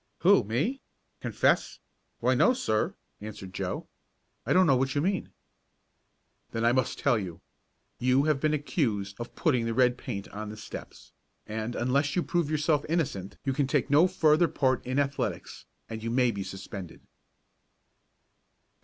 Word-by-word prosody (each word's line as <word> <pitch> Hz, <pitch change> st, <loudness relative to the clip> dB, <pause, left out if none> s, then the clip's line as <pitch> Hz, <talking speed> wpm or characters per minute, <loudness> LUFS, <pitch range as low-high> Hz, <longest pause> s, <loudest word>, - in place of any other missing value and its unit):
"Who, -, -, +6 dB
me? 145 Hz, -, -1 dB, 0.4 s
Confess? -, -, +1 dB, 0.4 s
Why, -, -, +3 dB
no, 250 Hz, -, +4 dB
sir," 110 Hz, -, 0 dB, 0.3 s
answered 100 Hz, -3 st, -8 dB
Joe. -, -, -3 dB, 0.6 s
"I -, -, 0 dB
don't 185 Hz, 0 st, +6 dB
know 140 Hz, -, +5 dB
what 130 Hz, +1 st, 0 dB
you -, -, +2 dB
mean." 190 Hz, +3 st, -1 dB, 1.2 s
"Then 115 Hz, 0 st, -2 dB
I 120 Hz, -, +5 dB
must 130 Hz, 0 st, 0 dB
tell 120 Hz, -, +2 dB
you. 90 Hz, -5 st, -6 dB, 0.6 s
You 130 Hz, +2 st, +3 dB
have 150 Hz, -2 st, +2 dB
been 155 Hz, +1 st, +2 dB
accused 110 Hz, -, -1 dB
of 120 Hz, -, -7 dB
putting 125 Hz, -9 st, +1 dB
the 115 Hz, -, -2 dB
red 125 Hz, -1 st, +3 dB
paint 100 Hz, -5 st, -5 dB
on 105 Hz, +1 st, -6 dB
the 110 Hz, -, -8 dB
steps, 110 Hz, -, -10 dB, 0.3 s
and, 110 Hz, +2 st, -4 dB
unless 140 Hz, +4 st, +1 dB
you 175 Hz, -, +2 dB
prove 170 Hz, -4 st, 0 dB
yourself 155 Hz, -1 st, +1 dB
innocent 130 Hz, -, -2 dB
you 135 Hz, -, +1 dB
can 135 Hz, 0 st, +1 dB
take 140 Hz, -2 st, 0 dB
no 155 Hz, +5 st, +6 dB
further 160 Hz, 0 st, +4 dB
part 130 Hz, -5 st, +1 dB
in 130 Hz, +1 st, -1 dB
athletics, 140 Hz, -1 st, -2 dB, 0.2 s
and 110 Hz, 0 st, -6 dB
you 115 Hz, -, -3 dB
may 125 Hz, 0 st, +3 dB
be 100 Hz, -, -5 dB
suspended." 95 Hz, -2 st, -8 dB
130 Hz, 160 wpm, -28 LUFS, 110-150 Hz, 1.2 s, Who